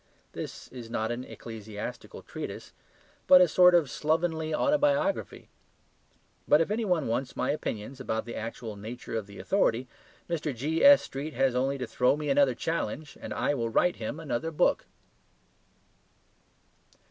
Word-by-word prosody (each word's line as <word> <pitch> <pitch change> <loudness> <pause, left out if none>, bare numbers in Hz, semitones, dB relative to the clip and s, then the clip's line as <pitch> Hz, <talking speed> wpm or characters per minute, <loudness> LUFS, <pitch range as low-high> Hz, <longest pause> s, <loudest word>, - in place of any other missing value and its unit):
This - - -7
is 120 -3 -9
not 110 0 -1
an 120 +1 -4
ecclesiastical 110 -4 -8
treatise - - -7 0.5
but 185 - +9
a 180 - +6
sort 180 +2 +6
of 165 -4 +4
slovenly 160 +2 -1
autobiography. 290 - +1 1.0
But 150 - +6
if 165 +5 0
any 225 +2 0
one 180 -8 +1
wants 125 +3 -2
my - - 0
opinions 130 -3 -4
about 110 -4 -2
the 120 - -7
actual 115 -1 -6
nature 115 +3 -7
of 110 -3 -3
the 100 - -12
authority, 130 - +1 0.4
Mr. 155 -5 -2
G.S.Street 155 - +3
has 135 -2 +2
only 135 +2 0
to 130 - -3
throw 125 +4 +2
me 150 -1 -3
another 140 -3 +4
challenge, 155 0 -3
and - - -7
I - - 0
will 115 -4 -1
write 180 +9 +2
him 120 +7 -5
another 145 -1 -2
book. 155 - +1
140 Hz, 145 wpm, -28 LUFS, 120-165 Hz, 1.0 s, but